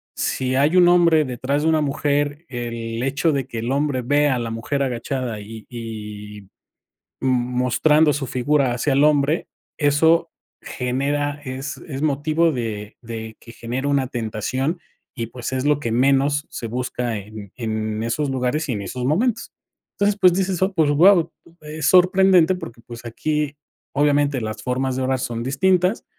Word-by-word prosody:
si 130 Hz, 0 st, -1 dB
hay 145 Hz, +6 st, +3 dB
un 180 Hz, -1 st, +7 dB
hombre 170 Hz, -3 st, +5 dB
detrás 130 Hz, +3 st, -2 dB
de 160 Hz, -, +3 dB
una 160 Hz, -1 st, +3 dB
mujer, 145 Hz, +1 st, -1 dB
el 115 Hz, -2 st, -4 dB
hecho 140 Hz, +5 st, +1 dB
de 135 Hz, -2 st, -1 dB
que 115 Hz, -3 st, -5 dB
el 115 Hz, +3 st, -2 dB
hombre 140 Hz, -2 st, 0 dB
vea 145 Hz, +3 st, +2 dB
a -, -, -2 dB
la 115 Hz, -1 st, -3 dB
mujer 115 Hz, +5 st, -2 dB
agachada 125 Hz, -2 st, -3 dB
y 110 Hz, +1 st, -10 dB
y, 105 Hz, -3 st, -8 dB, 0.8 s
mm, -, -, -1 dB, 0.3 s
mostrando 150 Hz, +5 st, +3 dB
su 140 Hz, -2 st, -3 dB
figura 130 Hz, +1 st, +1 dB
hacia 125 Hz, +4 st, -1 dB
el 140 Hz, +2 st, +4 dB
hombre, 150 Hz, +1 st, +2 dB, 0.3 s
eso 160 Hz, +3 st, +3 dB, 0.3 s
genera 145 Hz, +3 st, -2 dB
es 135 Hz, +2 st, -5 dB
es 135 Hz, -3 st, -5 dB
motivo 155 Hz, +3 st, +1 dB
de 110 Hz, -5 st, -5 dB
de 110 Hz, -2 st, -7 dB
que 115 Hz, -, -13 dB
genera 125 Hz, +4 st, -4 dB
una 140 Hz, -2 st, +1 dB
tentación 130 Hz, -, -2 dB, 0.4 s
y, 115 Hz, -3 st, -3 dB
pues, 120 Hz, +2 st, -6 dB
es 130 Hz, 0 st, -1 dB
lo 145 Hz, -1 st, +3 dB
que 120 Hz, -6 st, -3 dB
menos 140 Hz, +3 st, +2 dB
se 115 Hz, -, -6 dB
busca 125 Hz, 0 st, -3 dB
en 105 Hz, -1 st, -9 dB
en 110 Hz, -2 st, -3 dB
esos 140 Hz, +5 st, -1 dB
lugares 135 Hz, +4 st, -1 dB
y -, -, +1 dB
en 105 Hz, -, -3 dB
esos 125 Hz, +4 st, -4 dB
momentos". 225 Hz, -, 0 dB, 0.5 s
Entonces, 200 Hz, 0 st, +2 dB
pues, 185 Hz, -3 st, +6 dB
dices: 190 Hz, -1 st, -1 dB
"Oh, 190 Hz, +1 st, +1 dB
pues, 160 Hz, -5 st, +2 dB
guau". 170 Hz, +2 st, +5 dB, 0.3 s
Es 155 Hz, 0 st, -5 dB
sorprendente, 185 Hz, -1 st, +5 dB
porque, 120 Hz, -10 st, -9 dB
pues, 120 Hz, 0 st, -10 dB
aquí, 150 Hz, +5 st, -2 dB, 0.4 s
obviamente, 145 Hz, -2 st, +2 dB
las 110 Hz, -1 st, -5 dB
formas 130 Hz, +1 st, -1 dB
de 130 Hz, -, -1 dB
orar 130 Hz, 0 st, 0 dB
son 115 Hz, -2 st, -3 dB
distintas, 185 Hz, -, +1 dB
135 Hz, 165 wpm, -21 LUFS, 120-150 Hz, 0.8 s, un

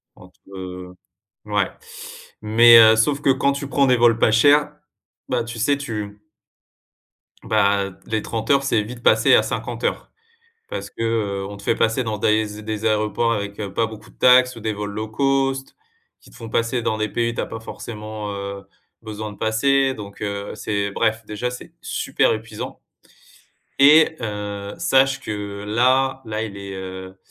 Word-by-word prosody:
entre, 90 Hz, 0 st, -18 dB, 0.2 s
heu 90 Hz, -1 st, -8 dB, 0.5 s
ouais, -, -, 0 dB, 0.7 s
mais 110 Hz, +1 st, +7 dB
sauf 140 Hz, +6 st, +1 dB
que -, -, +1 dB
quand 140 Hz, +1 st, +2 dB
tu 140 Hz, 0 st, -5 dB
prends 140 Hz, +1 st, +3 dB
des 125 Hz, -1 st, +4 dB
vols 115 Hz, -1 st, +4 dB
pas 110 Hz, -, +4 dB
chers, 145 Hz, +6 st, +4 dB, 0.6 s
bah, 120 Hz, -2 st, 0 dB
tu 115 Hz, 0 st, -7 dB
sais 140 Hz, +6 st, +2 dB
tu 105 Hz, -6 st, -6 dB, 1.2 s
bah 100 Hz, 0 st, +1 dB, 0.2 s
les 110 Hz, -1 st, -1 dB
30 110 Hz, +1 st, -5 dB
heures, 140 Hz, -1 st, +4 dB
c'est 110 Hz, -6 st, +1 dB
vite 120 Hz, +3 st, -9 dB
passé -, -, +5 dB
à -, -, +5 dB
50 -, -, -5 dB
heures. -, -, -2 dB, 0.6 s
Parce -, -, -5 dB
que, -, -, -8 dB
heu, 105 Hz, -4 st, -1 dB
on 100 Hz, -, -8 dB
te 100 Hz, -, -13 dB
fait -, -, +1 dB
passer 115 Hz, +3 st, +1 dB
dans 110 Hz, -2 st, -3 dB
des- 105 Hz, 0 st, 0 dB
des 110 Hz, 0 st, -4 dB
aéroports 110 Hz, +2 st, +1 dB
avec, 100 Hz, -1 st, -5 dB
heu, 100 Hz, -2 st, -5 dB
pas 115 Hz, +2 st, +1 dB
beaucoup 110 Hz, -1 st, -12 dB
de -, -, -27 dB
taxes 125 Hz, 0 st, +5 dB
ou -, -, -9 dB
des 110 Hz, 0 st, -2 dB
vols 105 Hz, 0 st, -5 dB
low 110 Hz, +2 st, -4 dB
cost. 135 Hz, +3 st, -1 dB, 0.4 s
Qui -, -, -19 dB
te -, -, -18 dB
font 115 Hz, -1 st, -9 dB
passer 115 Hz, +2 st, 0 dB
dans 110 Hz, -, -1 dB
des 110 Hz, 0 st, -1 dB
pays 115 Hz, +2 st, -1 dB
où -, -, -8 dB
tu -, -, -3 dB
as -, -, -2 dB
pas 115 Hz, -, -7 dB
forcément, 110 Hz, -2 st, -7 dB
heu, 100 Hz, 0 st, -6 dB, 0.4 s
besoin 110 Hz, -1 st, -6 dB
de 105 Hz, -, -13 dB
passer, 135 Hz, +5 st, +2 dB
donc 100 Hz, -4 st, -10 dB
heu, 100 Hz, -1 st, -4 dB
c'est 100 Hz, -1 st, -2 dB
bref, 110 Hz, +2 st, 0 dB
déjà 115 Hz, +4 st, -3 dB
c'est 125 Hz, -, -10 dB
super -, -, 0 dB
épuisant, -, -, -7 dB, 1.0 s
et 155 Hz, +3 st, +6 dB
heu, 105 Hz, -2 st, -5 dB
sache 135 Hz, 0 st, +3 dB
que 100 Hz, -3 st, -6 dB
là 130 Hz, +4 st, +2 dB
là, 110 Hz, 0 st, -3 dB
il 105 Hz, -3 st, -7 dB
est, 100 Hz, -1 st, -7 dB
heu 95 Hz, 0 st, -8 dB
110 Hz, 180 wpm, -21 LUFS, 105-125 Hz, 1.2 s, mais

